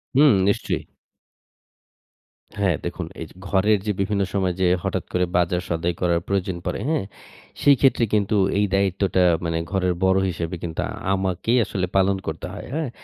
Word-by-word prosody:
হুম, 145 -1 +7
নিশ্চয়ই। 100 - 0 1.8
হ্যাঁ, 95 -4 +2
দেখুন, - - -4 0.2
এই - - -4
যে - - -18
ঘরের 100 +2 +3
যে 105 - +1
বিভিন্ন 100 0 0
সময় 95 -2 +1
যে - - +4 0.2
হঠাৎ - - -1
করে 90 0 +2
বাজার-সদাই 85 -1 0
করার 85 -2 +2
প্রয়োজন 95 -2 -1
পড়ে, - - -2
হ্যাঁ? 160 -10 +1 0.6
সেইক্ষেত্রে 135 -3 +4
কিন্তু 105 0 +2 0.2
এই 105 - +3
দায়িত্বটা 95 -1 +1 0.2
মানে 85 0 -1
ঘরের 90 -2 +1
বড় 95 0 +4
হিসেবে 85 0 -4
কিন্তু 80 -2 -3 0.3
আমাকেই 95 +5 0
আসলে 95 -1 -2
পালন 95 0 +3
করতে 80 - -4
হয়, - - -7
হ্যাঁ? 155 -3 -1
95 Hz, 150 wpm, -23 LUFS, 90-105 Hz, 1.8 s, হুম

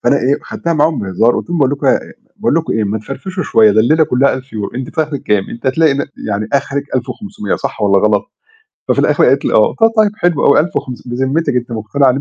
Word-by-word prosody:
فأنا 120 +4 +3
إيه 135 +1 +1
خدتها 170 - -3
معاهم 155 0 +1
بهزار 100 +5 +1
قُلت - - -5
لهم: 175 - -1
"باقول 135 -2 +3
لكم 145 - -3
إيه - - +5
يا - - -3
يا - - -13 0.2
باقول - - 0
لكم - - 0
إيه، 110 - 0
ما 105 +2 -2
تفرفشوا 185 - -6
شوية، 110 -9 +4
ده 110 - +4
الليلة 155 +8 +3
كُلّها 135 0 +2
1000€، 125 -6 -6
أنتِ 130 0 -5
في 160 - +2
آخرِك 150 -2 -5
كام؟ 105 -2 +1
أنتِ 120 +2 -8
هتلاقي 150 +3 +3
إن 140 - -2 0.2
يعني 105 +1 -2
آخرِك 140 0 -1
1500، 205 - -3
صح 135 -4 -5
والّا 100 -2 +3
غلط؟" 105 0 +2 0.6
ففي - - +1
الآخر - - +3
قالِت - - +3
لي: - - 0
"آه"، - - +4
قُلت: 225 0 +2
"طيب 210 -1 +2
حلو 175 -7 +1
أوي، - - +5
1500، 125 -7 -4
بذمتِك 135 +4 0
أنتِ 120 -1 -3
مقتنعة 130 +5 +1
135 Hz, 235 wpm, -15 LUFS, 110-155 Hz, 0.6 s, إيه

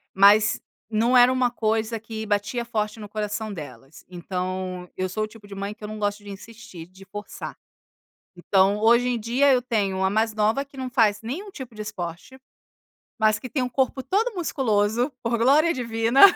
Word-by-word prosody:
mas 205 +2 +5 0.3
não 230 +3 +2
era 245 +1 +7
uma 255 -1 +2
coisa 225 0 -1
que 220 0 -6
batia 210 +3 -1
forte 215 -2 -2
no 210 - -7
coração 210 0 -3
delas, 150 -4 -10
então 185 0 -4
eu 185 - 0
sou 215 +4 -2
o - - -2
tipo 215 -1 -15
de 200 - -10
mãe 200 +1 -4
que 215 - -17
eu 210 - -4
não 215 0 -7
gosto 205 0 -2
de 205 - -8
insistir, 200 -4 -11
de 190 +1 -16
forçar. 205 +1 -8 0.8
Então 195 +3 +3
hoje 235 +3 +4
em 240 -2 -1
dia 255 +6 +3
eu 255 - +4
tenho 200 -6 -1
a 190 - +3
mais 220 +2 +1
nova 215 +6 +1
que 275 -1 -16
não 260 -1 -3
faz 220 -5 +3
nenhum 320 - -5
tipo 260 - -9
de 215 - -6
esporte, 185 +3 -7 0.8
mas 215 -1 +4
que 255 - -7
tem 260 +3 -1
um 250 - -2
corpo 265 +1 0
todo 430 - 0
musculoso 240 - +1
por 235 0 0
glória 290 +8 +4
divina. 230 0 +1
220 Hz, 190 wpm, -24 LUFS, 205-245 Hz, 0.8 s, era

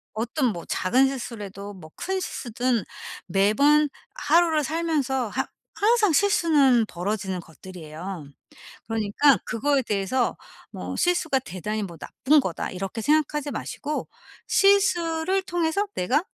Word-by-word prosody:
어떤 240 +5 -1
뭐 170 - -8
작은 255 +9 +2
실수라도 205 -6 -6
뭐 170 -5 -12
큰 380 0 -2
실수든 240 - -2 0.4
매번 280 - +4 0.3
하루를 330 -7 +3
살면서 285 -6 -1
하 - - -2 0.3
항상 430 -2 +3
실수는 295 - +4
벌어지는 190 0 -3
것들이에요. 170 0 -9 0.6
그러니까 225 +4 +3
그거에 275 +4 +1
대해서 220 +2 0 0.4
뭐 - - -6
'실수가 335 -6 +1
대단히 210 -2 -4
뭐 170 -4 -8
나쁜 285 - +2
거다.' 190 -11 -3
이렇게 195 +4 -5
생각하지 295 +1 +1
마시고 295 +2 -4 0.4
'실수를 380 -2 +3
통해서 350 +2 0
내가 260 - +1
260 Hz, 280 characters per minute, -25 LUFS, 200-315 Hz, 0.6 s, 매번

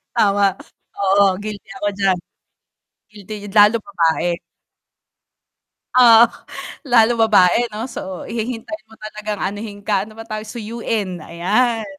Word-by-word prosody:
Tama, 200 -3 +3 0.5
oo 195 -1 +4
guilty 210 -1 -7
ako 205 - -1
diyan, 195 -2 +2 0.9
guilty 210 0 -10 0.2
lalo 210 +2 +6
babae. 170 -2 0 1.6
Oh. 235 -2 +8 0.6
Lalo 240 -1 +5
babae 215 +2 +4
'no 215 +3 -4
so 190 -7 -7
hihintayin 235 +4 -5
mo 220 - -16
talagang 215 -1 -6
anohin 205 +1 -5
ka, 200 -2 +1
ano 220 0 -15
ba 225 - -8
tawag, 215 -1 -6
suyuin 220 -6 -4
ayan. 215 +8 0
215 Hz, 115 wpm, -19 LUFS, 195-225 Hz, 1.6 s, Oh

